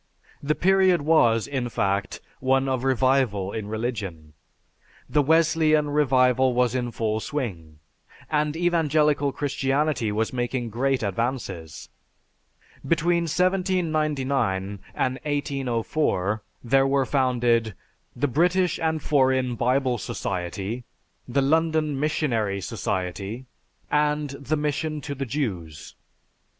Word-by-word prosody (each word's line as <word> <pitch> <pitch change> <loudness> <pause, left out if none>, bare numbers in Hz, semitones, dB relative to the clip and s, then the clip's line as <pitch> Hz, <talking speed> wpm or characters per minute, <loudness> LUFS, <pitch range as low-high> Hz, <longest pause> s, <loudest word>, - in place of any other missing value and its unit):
The 150 +2 0
period 190 -3 +3
was, 120 -8 +4
in 130 -4 -3
fact, 100 -2 -1 0.2
one 135 +1 +2
of 130 -2 -1
revival 130 -7 +1
in 110 -1 -5
religion. 105 -9 -4 0.7
The 150 - +2
Wesleyan 155 -1 +3
revival 130 -3 +3
was 125 -1 +2
in 125 -2 -1
full 110 -1 -1
swing, 90 - -5 0.5
and 150 0 0
Evangelical 155 -4 +2
Christianity 135 -3 0
was 110 +3 -1
making 120 -1 -2
great 130 +2 0
advances. 100 - -3 1.0
Between 170 +1 +1
1799 155 - 0 0.2
and 130 0 -1
1804 130 -7 -1 0.2
there 135 +3 +3
were 135 -1 +2
founded, 120 -5 +1 0.4
"The 145 +4 0
British 175 +6 +2
and 160 -2 -1
Foreign 130 -3 +2
Bible 125 +1 +1
Society," 95 +5 -4 0.4
"The 135 +2 +1
London 155 -1 +1
Missionary 115 -10 0
Society," 95 +6 -4 0.5
and 150 -1 +1
"The 140 +2 -2
Mission 150 +1 -2
To 140 - -5
The 135 -1 -4
Jews." 95 - -4
130 Hz, 105 wpm, -25 LUFS, 115-150 Hz, 1.0 s, was